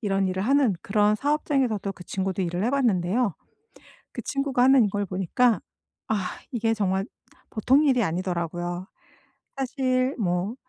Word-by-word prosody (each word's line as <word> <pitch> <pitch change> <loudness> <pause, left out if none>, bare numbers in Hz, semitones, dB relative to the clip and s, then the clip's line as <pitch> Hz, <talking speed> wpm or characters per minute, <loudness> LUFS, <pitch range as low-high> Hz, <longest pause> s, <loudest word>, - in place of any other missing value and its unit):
이런 195 -3 0
일을 185 +1 -2
하는 270 -4 +3
그런 210 +1 +2
사업장에서도 270 -7 0
그 180 - -13
친구도 190 0 -2
일을 175 +2 -2
해 240 - +1
봤는데요. 225 - +1 0.8
그 240 - -6
친구가 260 0 0
하는 260 -2 +6
이걸 205 0 -1
보니까 195 +6 +1 0.5
아 205 -4 -1 0.2
이게 225 -2 0
정말 195 -2 0 0.4
보통 260 +6 +3
일이 255 -4 +3
아니더라고요. 175 0 -3 0.7
사실 260 0 0
뭐 180 +1 -1
210 Hz, 305 characters per minute, -25 LUFS, 185-255 Hz, 0.8 s, 하는